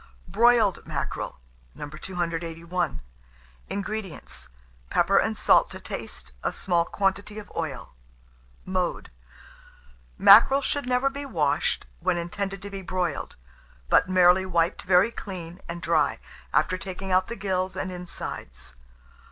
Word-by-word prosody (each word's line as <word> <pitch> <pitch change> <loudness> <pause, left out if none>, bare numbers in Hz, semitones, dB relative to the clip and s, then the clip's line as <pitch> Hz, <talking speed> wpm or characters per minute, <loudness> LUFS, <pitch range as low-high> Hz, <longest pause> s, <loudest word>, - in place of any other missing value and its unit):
BROILED 230 -4 +3
MACKEREL. - - -4 0.4
281. 170 - -3 0.7
INGREDIENTS. 200 - -5 0.4
Pepper - - +3
and - - 0
salt - - +5
to - - -9
taste, 65 0 -7
a - - -1
small 175 -3 +1
quantity 200 +2 -1
of 215 - -9
oil. 140 -7 -4 0.7
Mode. 185 -2 -2 1.1
Mackerel 265 +7 +8
should 285 -2 -1
never 255 +2 +2
be 280 +1 -6
washed 155 - 0
when 175 - +1
intended 195 +3 -4
to 200 - -7
be 195 -1 -5
broiled, 180 -4 -2 0.5
but - - +4
merely 185 0 +5
wiped 170 -2 +1
very 185 +5 +4
clean 180 -5 -8
and 170 0 -6
dry, 160 -3 +2 0.3
after 185 +2 +2
taking 190 +2 -6
out 185 0 +3
the 235 - -5
gills 185 -3 -2
and 185 - -3
insides. 175 - -7
185 Hz, 120 wpm, -26 LUFS, 170-200 Hz, 1.1 s, Mackerel